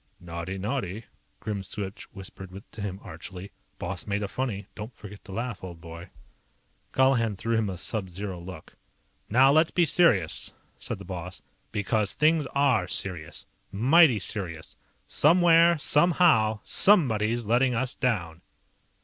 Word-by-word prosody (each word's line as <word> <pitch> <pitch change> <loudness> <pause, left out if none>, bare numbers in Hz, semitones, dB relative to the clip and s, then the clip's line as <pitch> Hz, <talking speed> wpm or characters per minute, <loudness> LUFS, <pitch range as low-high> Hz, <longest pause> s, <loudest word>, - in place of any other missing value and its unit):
"Naughty, 85 +1 -6
naughty," 105 -1 -3 0.4
Grimswitch 100 -1 -5
whispered 95 -1 -9 0.2
to 110 - -9
him 100 -1 -4
archly. 95 +4 -9 0.3
"Boss - - -5
made 100 0 -1
a - - -2
funny. 105 -3 -3
Don't 110 +3 -9
forget 105 -1 -11
to 100 - -10
laugh, 115 0 -4
old 85 -3 -8
boy." 85 +1 -10 0.8
Colihan 125 -5 +2
threw 115 +4 -1
him 110 -2 +1
a 90 - -5
sub 100 0 -3
zero 95 0 -6
look. 90 +2 -10 0.6
"Now 130 +5 +5
let's 155 +2 +4
be 175 - +2
serious," 120 - +2 0.3
said - - -5
the - - -11
boss. 90 0 -7 0.3
"Because 105 -1 0
things 155 -2 +2
are 135 -10 +3
serious. 90 -4 -5 0.3
Mighty 130 - +5
serious. 85 -5 -4 0.3
Somewhere, 170 +1 +5
somehow, 150 -9 +3
somebody's 120 - +2
letting 120 +3 +2
us 130 +3 -1
down!" 85 -10 -2
105 Hz, 135 wpm, -27 LUFS, 95-130 Hz, 0.8 s, Now